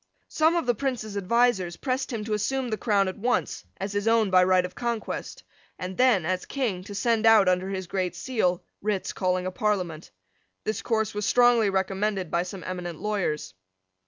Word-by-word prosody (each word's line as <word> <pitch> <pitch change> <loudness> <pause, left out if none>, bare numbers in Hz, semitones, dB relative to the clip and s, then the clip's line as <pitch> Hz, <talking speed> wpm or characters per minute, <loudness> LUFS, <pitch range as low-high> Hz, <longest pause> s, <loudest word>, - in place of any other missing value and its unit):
Some 320 +2 +3
of 340 - 0
the 245 - +3
Prince's 230 -4 -3
advisers 200 -4 +1
pressed 265 0 -2
him 220 -3 -4
to 215 - -2
assume 245 +4 -1
the - - +1
crown 200 -4 +2
at 185 - -5
once 245 +4 -1
as 195 +1 -4
his 205 +1 -1
own 225 -3 +3
by 185 0 +6
right 185 0 +3
of 180 - -7
conquest, 235 -2 -4 0.3
and 185 +1 -5
then, 245 -8 +3
as 185 +1 -1
King, 225 -10 -2
to 205 - -8
send 225 +1 +2
out, 220 -4 +7
under 185 +1 +1
his 190 -1 -3
Great 185 0 -2
Seal, 200 -9 0 0.2
writs 205 -2 -2
calling 185 -1 0
a 185 - -2
Parliament. 185 -6 -2 0.5
This 215 - -2
course 220 -3 0
was 210 0 -2
strongly 240 -3 +5
recommended 195 -1 -1
by 170 - +2
some 180 +1 -7
eminent 180 -3 -5
lawyers. 175 - -2
205 Hz, 190 wpm, -26 LUFS, 185-230 Hz, 0.5 s, out